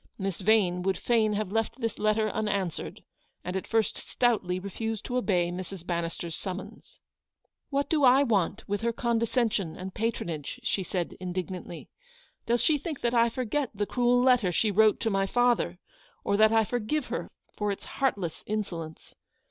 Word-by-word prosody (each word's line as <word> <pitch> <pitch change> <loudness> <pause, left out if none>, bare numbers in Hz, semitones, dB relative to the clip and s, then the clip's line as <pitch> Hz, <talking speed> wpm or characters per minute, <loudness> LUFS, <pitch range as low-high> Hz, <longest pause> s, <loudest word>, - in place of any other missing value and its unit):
Miss 195 -2 -3
Yane 190 -3 +3
would 190 0 0
fain 220 -3 +2
have 205 -2 -2
left 225 +4 -1
this 230 -3 -2
letter 215 +1 +2
unanswered, 200 -5 -2 0.4
and 180 - -4
at 190 - -3
first 225 -2 +1
stoutly 205 -7 +1
refused 220 +3 -4
to 250 - -3
obey 180 -7 +1
Mrs. 180 0 -6
Bannister's 170 -1 -3
summons. 190 0 -7 0.4
" - - -51
What 280 0 0
do 305 -3 +1
I 260 +2 +7
want 205 -5 0
with 205 +1 -1
her 235 0 +1
condescension 230 -6 0
and 185 +1 -6
patronage? 170 -10 -3
w 250 -2 -20
she 200 - +1
said, 180 -2 -3
indignantly. 180 -1 -5
tc - - -27
Does 235 +1 +2
she 300 -2 +3
think 305 -2 -5
that 240 0 +1
I 235 0 +4
forget 255 +3 -1
the 205 +1 0
cruel 245 +2 +2
letter 250 -7 +4
she 210 +5 +2
wrote 215 +2 +4
to 225 - +1
my 195 0 +1
father; 240 -6 +2 0.5
or 200 - +1
that 215 +1 +5
I 225 0 +4
forgive 245 +6 -1
her - - -3 0.3
for 210 -1 -1
its 200 - -6
heartless 200 - -2
insolence 175 -7 -4
215 Hz, 175 wpm, -28 LUFS, 185-235 Hz, 0.5 s, I